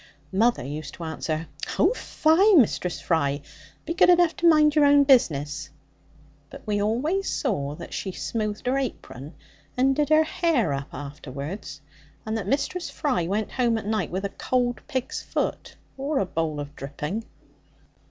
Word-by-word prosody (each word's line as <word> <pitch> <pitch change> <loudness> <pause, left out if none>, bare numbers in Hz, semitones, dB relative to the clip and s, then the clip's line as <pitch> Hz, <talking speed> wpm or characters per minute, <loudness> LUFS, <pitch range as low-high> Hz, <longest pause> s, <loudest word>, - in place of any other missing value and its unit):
Mother 225 - +2
used 145 +3 -6
to 170 - -8
answer 160 0 -3 0.3
'Oh 360 - +4
fie, 380 -1 +3
Mistress 205 - +2
Fry! 145 -4 0 0.4
be 330 - -2
good 350 - +5
enough 350 -2 +5
to 345 - +3
mind 305 -2 +5
your 300 -1 +4
own 285 0 +6
business.' 150 - +2 0.8
But - - -12
we 205 -1 0
always 290 - 0
saw 145 - -1
that - - -9
she 190 - -3
smoothed 215 +2 -3
her 260 +2 +1
apron, 155 - -6 0.4
and 270 +2 +3
did 295 0 +1
her 310 0 +6
hair 310 - +1
up 140 +1 -5
afterwards, 145 +2 -7 0.4
and 220 0 -2
that 210 -4 -3
Mistress 340 - -1
Fry 250 - -1
went 210 +3 -1
home 240 -3 +1
at 220 - -5
night 215 +1 -1
with 190 +3 -3
a - - -1
cold 245 +3 -1
pig's 260 -4 -3
foot - - -3 0.2
or 280 +2 -1
a 200 - +2
bowl 160 -4 -2
of 145 0 -7
dripping. 150 +10 -5
220 Hz, 160 wpm, -25 LUFS, -, 0.8 s, own